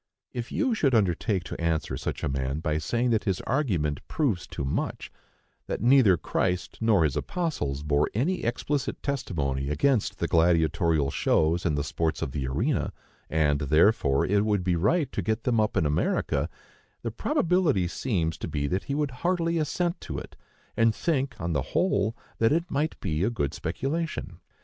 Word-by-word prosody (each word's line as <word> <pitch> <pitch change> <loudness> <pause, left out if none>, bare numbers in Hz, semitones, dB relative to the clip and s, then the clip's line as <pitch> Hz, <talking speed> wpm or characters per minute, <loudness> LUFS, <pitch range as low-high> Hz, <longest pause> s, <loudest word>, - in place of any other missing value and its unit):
If 120 +1 -5
you 265 -5 +1
should 140 - +2
undertake 100 -1 +1
to - - -7
answer 80 -2 0
such - - -4
a - - +1
man 65 +1 -2
by 75 -1 -1
saying 120 +10 0
that 110 -2 +1
his 95 -4 0
argument 90 - 0
proves 115 - 0
too 70 - -4
much,—that 65 - -6
neither 120 -5 +5
Christ 90 +2 -2
nor 110 -6 +4
his 75 -3 +1
apostles 105 - -2
bore 75 0 +2
any 170 - 0
explicit 140 +4 -2
testimony 70 - -2
against 105 - +1
the - - -1
gladiatorial 80 -3 +2
shows 85 +6 +2
and 75 -3 0
the 70 - 0
sports 80 +3 -1
of - - -3
the 65 -1 -3
arena, 65 - 0 0.4
and, 75 -2 +2
therefore, 75 0 +3
it 100 +1 +2
would 105 -3 +1
be 90 -1 +1
right 125 - +1
to - - -2
get 110 +4 -1
them 120 -3 +2
up 105 -1 +1
in 85 - +2
America,—the 75 0 -2
probability 165 - +1
seems 85 -6 -1
to - - -4
be 70 -2 -2
that 90 +7 -1
he 140 - -2
would 145 -2 0
heartily 170 -2 +1
assent 170 +3 -1
to - - -5
it, - - -8 0.4
and 115 -1 +3
think, 140 -5 0
on 85 0 -2
the 70 - +1 0.2
whole, 105 +3 +1 0.2
that 115 - +4
it 170 +3 0
might 150 +3 -1
be 80 -2 -1
a 105 - +2
good 70 -13 -2
speculation. 160 +4 -3
95 Hz, 175 wpm, -27 LUFS, -, 0.4 s, neither